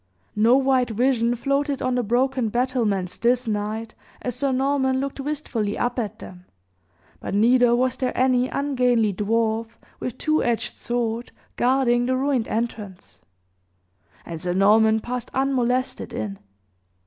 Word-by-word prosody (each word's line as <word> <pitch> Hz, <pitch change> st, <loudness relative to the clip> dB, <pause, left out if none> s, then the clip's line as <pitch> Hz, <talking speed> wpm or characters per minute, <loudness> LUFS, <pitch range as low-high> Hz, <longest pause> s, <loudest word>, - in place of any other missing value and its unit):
No 230 Hz, +4 st, +5 dB
white 260 Hz, -2 st, +2 dB
vision 235 Hz, +1 st, +1 dB
floated 275 Hz, +2 st, -1 dB
on 255 Hz, -, -1 dB
the 250 Hz, -, +1 dB
broken 245 Hz, +1 st, 0 dB
battlements 225 Hz, -6 st, -1 dB
this 245 Hz, +1 st, +1 dB
night, 215 Hz, +1 st, -3 dB, 0.3 s
as 250 Hz, -, -2 dB
Sir 275 Hz, +1 st, 0 dB
Norman 265 Hz, 0 st, +1 dB
looked 275 Hz, +1 st, -4 dB
wistfully 270 Hz, -7 st, -2 dB
up 245 Hz, +1 st, -1 dB
at 215 Hz, -5 st, -4 dB
them; 180 Hz, 0 st, -12 dB, 0.7 s
but -, -, -4 dB
neither 240 Hz, +3 st, +4 dB
was 255 Hz, +1 st, 0 dB
there 255 Hz, -2 st, -1 dB
any 255 Hz, 0 st, +2 dB
ungainly 250 Hz, -6 st, +1 dB
dwarf, 225 Hz, +3 st, 0 dB, 0.3 s
with 250 Hz, -, -5 dB
two 310 Hz, 0 st, +1 dB
edged 235 Hz, -2 st, -1 dB
sword, 235 Hz, 0 st, -3 dB, 0.2 s
guarding 245 Hz, -1 st, +2 dB
the 255 Hz, 0 st, +1 dB
ruined 265 Hz, -3 st, 0 dB
entrance; 215 Hz, -4 st, -5 dB, 1.0 s
and 165 Hz, -2 st, -7 dB
Sir 180 Hz, -1 st, -1 dB
Norman 220 Hz, +3 st, +4 dB
passed 245 Hz, +1 st, -5 dB
unmolested 255 Hz, -2 st, 0 dB
in. 210 Hz, -4 st, -4 dB
245 Hz, 135 wpm, -23 LUFS, 220-260 Hz, 1.0 s, No